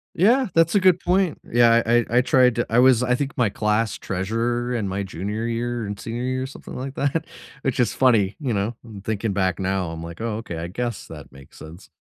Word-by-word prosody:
Yeah, 240 +9 +4
that's 165 0 +3
a - - +6
good 185 -2 +4
point. 185 -2 +1
Yeah. 115 0 +5
I 120 +1 +4
I 120 - -1
I - - +6
tried 125 -1 +3
to 120 - 0
I 115 - +3
was 125 -1 +5
I 125 0 +2
think 140 +2 -4
my 115 -5 +2
class 105 +1 0
treasurer 115 +6 -2
in 110 -5 -1
my 95 +1 -2
junior 100 +5 -4
year 120 0 -2
and 100 0 -6
senior 120 +2 -5
year 130 0 -1
or - - -3
something 135 - -11
like 135 +2 -6
that, 150 +3 -1 0.4
which 135 -2 -2
is 120 -4 +2
funny, 110 -7 +3
you 130 -7 -2
know? 105 +4 -1
I'm 110 -4 -10
thinking 110 0 -2
back 95 -3 0
now, 95 -2 -1
I'm 80 0 -7
like, 85 +4 -8
"Oh, 115 -2 -2
okay, 100 -7 -6
I 85 +1 -4
guess 120 +4 -4
that 75 -4 -11
makes 70 0 -16
sense." 85 +4 -12
115 Hz, 235 wpm, -23 LUFS, 100-125 Hz, 0.4 s, a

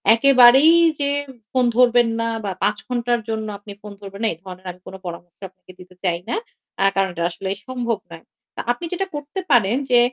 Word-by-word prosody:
একেবারেই 265 +4 +7 0.3
যে 280 0 0 0.2
উ - - -15 0.2
ফোন 255 -1 +2
ধরবেন 245 -1 +5
না 230 - 0 0.2
বা 195 - -1
৫ - - +1
ঘন্টার 240 -1 0
জন্য 220 -1 -2
আপনি 205 0 -11
ফোন 210 - -9
ধরবেন 200 +1 -9
না, - - +3
এই - - -14
ধরনের 185 -1 -10
আমি 180 - -17
কোন - - -8
পরামর্শ 175 0 -8
আপনাকে 185 0 -18
দিতে 180 0 -15
চাই 175 -2 0
না। - - 0 0.5
আ - - +4
কারণ 195 0 +2
এটা 170 - -3
আসলেই 190 +3 -4
সম্ভব 240 -3 -2
নয়। 165 -1 -11 0.3
তা - - -3
আপনি 245 +8 -4
যেটা 385 +2 -2
করতে 295 +5 -5
পারেন 235 -2 +4
যে, 245 - +6
225 Hz, 205 wpm, -21 LUFS, 190-250 Hz, 0.5 s, একেবারেই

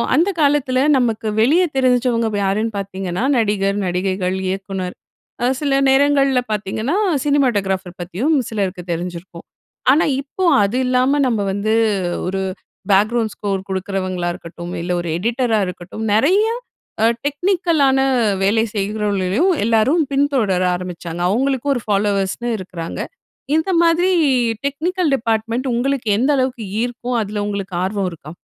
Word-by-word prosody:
அந்த 335 +7 +3
காலத்தில 280 -3 +2 0.2
நமக்கு 230 -3 0
வெளிய 305 +11 +4
தெரிஞ்சவங்க 250 -3 +2
வ - - 0
யாருன்னு 215 +3 0
பாத்தீங்கன்னா, 190 0 -4
நடிகர், 205 -3 +1
நடிகைகள், 185 +1 -1
இயக்குனர். 190 -1 -4 0.5
அ - - +3 0.2
சில 280 -2 +1
நேரங்கள்ல 275 -1 +3
பாத்தீங்கன்னா, 215 - -1 0.3
சினிமாட்டோகிராஃபர் 200 -10 0
பத்தியும் 200 - 0
சிலருக்கு 195 -4 -3
தெரிஞ்சிருக்கும். 170 0 -6 0.5
ஆனா, 295 +5 +4 0.2
இப்போ 285 +7 -6 0.2
அது 200 +5 0
இல்லாம, 255 +3 +2
நம்ம 230 -4 0
வந்து 205 +2 0 0.5
ஒரு 190 +1 -2 0.5
பேக்கிரவுண்ட் 215 +2 +2
ஸ்கோர் 195 -2 -3
கொடுக்குறவங்களா 185 -2 -2
இருக்கட்டும், 170 +1 -8
இல்ல 175 +1 -3
ஒரு 170 - -5
எடிட்டரா 230 +2 +1
இருக்கட்டும், 180 +4 -6
நெறையா 380 - +3 0.5
அ - - +6 0.2
டெக்னிக்கலான 305 -3 +2 0.4
வேலை 220 +3 +3
செய்கிறவர்களையும், 205 - 0
எல்லாரும் 230 +9 +3
பின்தொடர 270 -10 +1
ஆரம்பிச்சாங்க. 175 -1 -6
அவுங்களுக்கும் 265 +5 +1
ஒரு 245 - -2
ஃபாலோவர்ஸ்ன்னு 200 +2 0
இருக்கிறாங்க. 180 -3 -7 0.6
இந்த 320 +4 +1
மாதிரி 340 +2 +3 0.5
டெக்னிக்கல் 325 +4 0
டிபார்ட்மெண்ட் 230 +1 -1
உங்களுக்கு 250 0 -1
எந்த 260 +6 +2
அளவுக்கு 255 -3 -1 0.2
ஈர்க்கும்? 245 0 -2
அதுல 205 0 -3
உங்களுக்கு 200 -3 -4
ஆர்வம் 195 0 -1
இருக்கா? 155 -2 -11
220 Hz, 120 wpm, -19 LUFS, 190-270 Hz, 0.6 s, அ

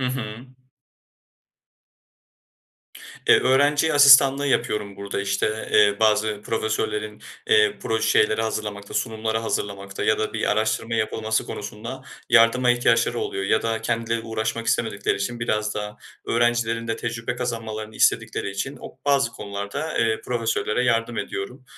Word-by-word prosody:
Hı 130 - 0
hı. 120 -2 -5 2.8
Eee, - - +7
öğrenci 145 +4 +3
asistanlığı 140 -1 +7
yapıyorum 105 -6 -1
burada, 100 0 -4
işte, 100 +2 -2
eee, 105 -1 +5
bazı 110 -1 +2
profesörlerin, 110 -1 -3 0.3
eee, 445 -2 +4
proje 110 0 0
şeyleri 110 +1 +3
hazırlamakta, 105 -2 -4
sunumları 110 -1 -1
hazırlamakta 100 -3 -4
ya 110 - +2
da 110 - -2
bir 110 - -1
araştırma 110 +2 0
yapılması 110 0 -1
konusunda 115 +5 -7 0.3
yardıma 125 +1 +5
ihtiyaçları 120 0 +2
oluyor 95 - -3
ya 105 +2 +1
da 115 -1 -2
kendileri 115 0 -1
uğraşmak 115 0 -3
istemedikleri - - 0
için 120 +4 -4
biraz 105 -2 -1
da 105 0 -5 0.3
öğrencilerin 115 -1 0
de 115 - -1
tecrübe 115 +1 -4
kazanmalarını 110 -3 -5
istedikleri - - +1
için 100 +9 -4
o - - -11
bazı 140 -1 +3
konularda, 100 +9 -5
eee, 115 -1 +1
profesörlere 115 0 -1
yardım 115 -1 0
ediyorum. 125 +7 -5
115 Hz, 130 wpm, -23 LUFS, 105-120 Hz, 2.8 s, Eee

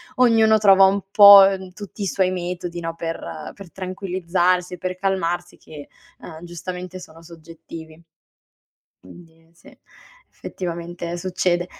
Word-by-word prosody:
ognuno 225 -3 +4
trova 195 -2 +5
un 195 +1 +3
pò, 200 -1 +9
ehm, 190 -1 -6
tutti 205 +2 -11
i - - -1
suoi 185 0 0
metodi, 175 -1 -5
no, 165 0 -5
per 165 -1 -7
per 195 -4 -13
tranquillizzarsi, 180 -1 -2
per 185 +1 -5
calmarsi 175 -2 -3
che, 150 -2 -13 0.3
uhm, 160 -1 -12
giustamente 180 +1 -8
sono 165 -2 -14
soggettivi. 165 -1 -13 1.0
Quindi, 165 - -18
sì 170 - -19 0.6
effettivamente 170 -1 -6
succede. 175 -1 -2
180 Hz, 120 wpm, -21 LUFS, 170-190 Hz, 1.0 s, pò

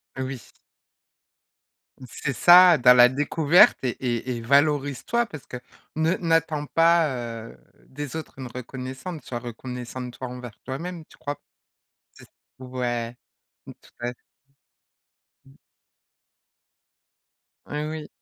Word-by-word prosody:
Oui. 130 0 -4 1.7
C'est 450 0 -4
ça: 180 -1 +8
dans 125 -1 +7
la 125 0 +7
découverte 150 +5 +4
et 130 - +1
et 125 0 -2
et - - -6
valorise-toi 145 - +1
parce 155 - -11
que 125 - -6 0.4
ne 160 +2 +2
n'attends 165 -3 0
pas, 165 0 +4 0.4
heu, - - -15 0.3
des 145 0 -7
autres 160 -4 -7
une 130 - -7
reconnaissante, 130 +6 -7
soit 120 - -4
reconnaissante, 125 +1 -7
toi, 130 - -7
envers 125 -3 -9
toi-même, 165 +5 -6
tu - - -20
crois 145 0 -4
p 145 - -36 0.7
c'est - - -17
ç - - -27 0.3
ouais. 125 -2 -3 0.5
Mmh, - - -10
tout - - -20
à 120 +1 -2
f - - -15 1.3
Mmh. 135 +1 -20 2.1
Heu, 150 +1 -4
oui. 155 -1 -6
135 Hz, 125 wpm, -24 LUFS, 125-160 Hz, 2.1 s, ça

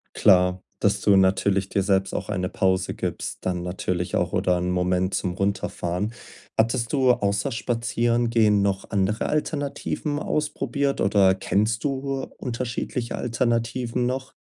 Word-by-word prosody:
Klar, 90 -2 +4 0.2
dass 100 0 +1
du 100 -1 +4
natürlich 95 0 +2
dir 100 - +1
selbst 95 0 +1
auch - - -3
eine 90 -3 -1
Pause 95 0 +1
gibst, - - -4
dann 90 -1 -1
natürlich 90 0 -3
auch, 90 0 0
oder 90 -2 +2
'nen 90 +1 -1
Moment 90 +1 0
zum 90 - -1
Runterfahren. 95 0 -2 0.5
Hattest 115 +1 +1
du 130 -3 +4
außer 100 +4 0
Spazierengehen 115 -2 +1
noch 100 -1 -1
andere 100 +1 0
Alternativen 145 0 -2
ausprobiert, 140 -2 -1
oder 95 -1 +4
kennst 110 +4 0
du 135 -1 -2
unterschiedliche 120 0 -3
Alternativen 120 +1 -1
noch? 130 +2 -3
105 Hz, 135 wpm, -24 LUFS, 95-120 Hz, 0.5 s, Klar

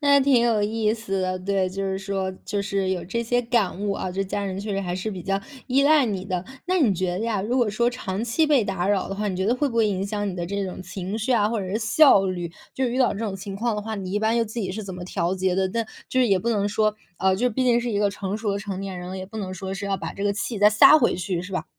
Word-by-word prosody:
那 280 -1 +5
挺 265 -3 +4
有 225 -3 +2
意 215 0 +1
思 195 -4 -2
的， 185 0 -1
对， 190 0 0
就 195 +2 -4
是 190 0 -1
说 190 -1 -2
就 205 - -2
是 195 -2 -1
有 180 -2 -1
这 235 +5 -2
些 245 +1 +1
感 230 -5 0
悟 205 -1 0
啊， 185 - -3
这 195 +2 -1
家 200 +1 -3
人 190 0 -3
确 210 - -5
实 195 - -1
还 180 -1 -3
是 185 +4 -3
比 185 -3 -6
较 195 0 -1 0.3
依 265 +2 +3
赖 295 0 +5
你 195 -5 -3
的。 185 -2 -2 0.2
那 370 0 +2
你 250 -10 +4
觉 185 -1 -1
得 180 - -3
呀， 225 -3 0
如 225 +6 -1
果 240 -5 +2
说 235 +3 +2
长 210 -5 -4
期 240 +7 +2
被 290 -5 +4
打 190 -3 -2
扰 200 -2 +1
的 195 - -3
话， 210 +1 -2
你 185 - -2
觉 190 - -1
得 235 - +3
会 290 +3 +1
不 240 - -4
会 225 -2 +4
影 195 0 -1
响 205 0 -2
你 185 - -5
的 175 - -2
这 200 +3 -2
种 185 - -7
情 190 +2 -5
绪 230 +4 0
啊， 210 -3 +3
或 230 0 -1
者 190 - -3
是 215 - 0
效 220 -2 +5
率？ 175 -2 -3 0.2
就 265 - 0
是 240 - -1
遇 255 - -1
到 255 - +3
这 - - -6
种 215 -4 -2
情 195 0 -6
况 230 +1 0
的 210 - -2
话， 220 +1 -4
你 190 -2 -5
一 205 - +1
般 220 +2 +1
又 230 - +2
自 225 +2 -5
己 190 - -2
是 210 +3 -5
怎 190 -2 -6
么 180 - -7
调 180 -1 -1
节 185 -1 0
的？ 190 0 +2
但 230 +2 -1 0.2
就 260 - +2
是 245 - +3
也 195 -2 +4
不 235 +5 -1
能 205 -2 +1
说， 215 0 +1 0.2
呃， 190 0 +3
就 230 +6 +1
是 250 - +1
毕 255 +4 0
竟 240 -1 +4
是 240 - -2
一 205 - 0
个 205 -1 +2
成 200 0 -4
熟 215 -2 -1
的 200 - -1
成 200 -2 -5
年 195 -2 -5
人 180 0 -7
了， 190 - -5
也 185 - -5
不 220 +3 -8
能 185 -2 -4
说 190 +1 -5
是 200 +1 -4
要 195 - 0
把 - - -5
这 200 - -6
个 205 0 +1
气 210 +1 -3
再 205 - +7
撒 215 +8 +8
回 240 - +2
去， 180 -1 -2
是 180 +2 -8
吧？ 185 - -3
200 Hz, 345 characters per minute, -24 LUFS, 190-230 Hz, 0.3 s, 撒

